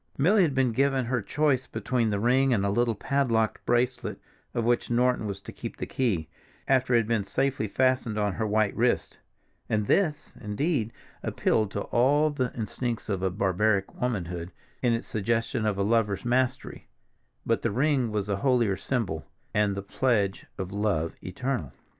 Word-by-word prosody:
Milly 195 Hz, +9 st, +4 dB
had 155 Hz, -7 st, +2 dB
been 130 Hz, -2 st, +3 dB
given 135 Hz, +1 st, +1 dB
her 125 Hz, 0 st, 0 dB
choice 135 Hz, +3 st, +1 dB
between 125 Hz, -4 st, -1 dB
the 100 Hz, -1 st, 0 dB
ring 130 Hz, +3 st, +3 dB
and 100 Hz, -2 st, 0 dB
a 100 Hz, -, +1 dB
little 120 Hz, +1 st, +1 dB
padlocked 115 Hz, -2 st, 0 dB
bracelet 120 Hz, +1 st, 0 dB, 0.4 s
of 120 Hz, -, +1 dB
which 120 Hz, +1 st, +1 dB
Norton 125 Hz, -2 st, +2 dB
was 100 Hz, -1 st, -4 dB
to -, -, -9 dB
keep -, -, -7 dB
the -, -, -3 dB
key, 100 Hz, -12 st, -1 dB, 0.4 s
after 130 Hz, -2 st, +3 dB
it 115 Hz, -, +6 dB
had 110 Hz, -, -6 dB
been 115 Hz, -3 st, +1 dB
safely 130 Hz, +3 st, 0 dB
fastened 130 Hz, -1 st, +1 dB
on 105 Hz, -2 st, +1 dB
her 110 Hz, +1 st, -2 dB
white 105 Hz, -1 st, +1 dB
wrist, -, -, 0 dB, 0.5 s
and 105 Hz, -1 st, +1 dB
this, 160 Hz, -, +1 dB
indeed, 115 Hz, +2 st, -1 dB, 0.3 s
appealed 110 Hz, -2 st, +1 dB
to 100 Hz, -, -2 dB
all 145 Hz, +8 st, +3 dB
the 130 Hz, -4 st, -1 dB
instincts 115 Hz, +1 st, -3 dB
of 95 Hz, -1 st, -1 dB
barbaric 100 Hz, +1 st, +1 dB
womanhood, 90 Hz, -8 st, -3 dB, 0.3 s
in 120 Hz, -2 st, +3 dB
its 115 Hz, -, -2 dB
suggestion 115 Hz, +1 st, -1 dB
of 105 Hz, -2 st, 0 dB
a 100 Hz, -, +1 dB
lover's 105 Hz, -1 st, +1 dB
mastery; 125 Hz, +1 st, -1 dB, 0.6 s
but -, -, +1 dB
the -, -, +1 dB
ring 130 Hz, +1 st, +1 dB
was 105 Hz, -2 st, -1 dB
the 100 Hz, -1 st, -1 dB
holier 120 Hz, -5 st, +2 dB
symbol, 95 Hz, -, -2 dB, 0.3 s
and 105 Hz, -1 st, +2 dB
the 100 Hz, -, -4 dB
pledge 100 Hz, -3 st, 0 dB
of 95 Hz, 0 st, -4 dB
love 100 Hz, -6 st, 0 dB
eternal. 95 Hz, -, -3 dB
115 Hz, 170 wpm, -27 LUFS, 100-130 Hz, 0.6 s, it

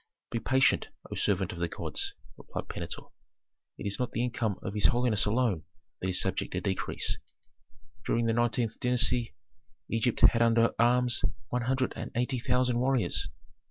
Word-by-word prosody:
"Be 115 Hz, -, -1 dB
patient, 130 Hz, +3 st, +3 dB, 0.2 s
O -, -, -3 dB
servant 95 Hz, -3 st, +1 dB
of 85 Hz, -, -8 dB
the 85 Hz, -, 0 dB
gods," -, -, -3 dB, 0.2 s
replied -, -, -7 dB
Pentuer. -, -, -6 dB, 0.7 s
"It -, -, -7 dB
is 100 Hz, +3 st, -1 dB
not 125 Hz, -, -2 dB
the 120 Hz, -, 0 dB
income 120 Hz, -5 st, -1 dB
of 95 Hz, -, -4 dB
his 105 Hz, -, -1 dB
holiness 120 Hz, -3 st, +2 dB
alone 105 Hz, -6 st, +1 dB, 0.4 s
that 95 Hz, -, -1 dB
is 95 Hz, -, +2 dB
subject -, -, -1 dB
to -, -, 0 dB
decrease. 95 Hz, -2 st, -1 dB, 0.8 s
During 115 Hz, 0 st, +1 dB
the 115 Hz, -, +2 dB
nineteenth 120 Hz, -1 st, 0 dB
dynasty 125 Hz, -1 st, +3 dB, 0.6 s
Egypt 115 Hz, +1 st, 0 dB
had 115 Hz, -, +6 dB
under 115 Hz, 0 st, +4 dB
arms 125 Hz, +1 st, +3 dB, 0.3 s
one 125 Hz, -, -1 dB
hundred 130 Hz, 0 st, 0 dB
and -, -, -5 dB
eighty 125 Hz, +2 st, 0 dB
thousand 125 Hz, 0 st, +1 dB
warriors. 130 Hz, -1 st, +1 dB
120 Hz, 160 wpm, -29 LUFS, 110-125 Hz, 0.8 s, had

